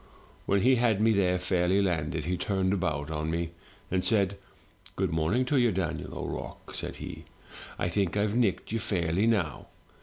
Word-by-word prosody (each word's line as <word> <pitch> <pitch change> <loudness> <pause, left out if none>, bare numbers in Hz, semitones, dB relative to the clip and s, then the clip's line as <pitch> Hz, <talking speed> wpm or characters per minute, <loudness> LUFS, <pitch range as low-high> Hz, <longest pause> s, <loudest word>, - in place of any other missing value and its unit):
"When 100 0 +3
he 130 +3 +5
had 115 -4 +2
me 110 +1 +4
there 90 -3 +3
fairly 90 +1 +2
landed, 80 -5 0
he 90 +2 0
turned 95 +1 0
about 80 -6 -1
on 80 0 -2
me, 85 0 -1 0.4
and 90 0 +1
said, 100 -3 +2 0.6
*Good - - 0
morning 80 +11 +1
to 140 +2 +1
you, 120 -2 +4
Daniel 95 -1 -3
O'Rourke,* - - -6
said - - -4
he; - - -7 0.5
*I 85 - 0
think 95 +1 0
Tve 105 0 +1
nicked 105 -7 +1
you 115 - 0
fairly 90 0 +1
now. 100 -9 0
95 Hz, 175 wpm, -29 LUFS, 85-105 Hz, 0.6 s, he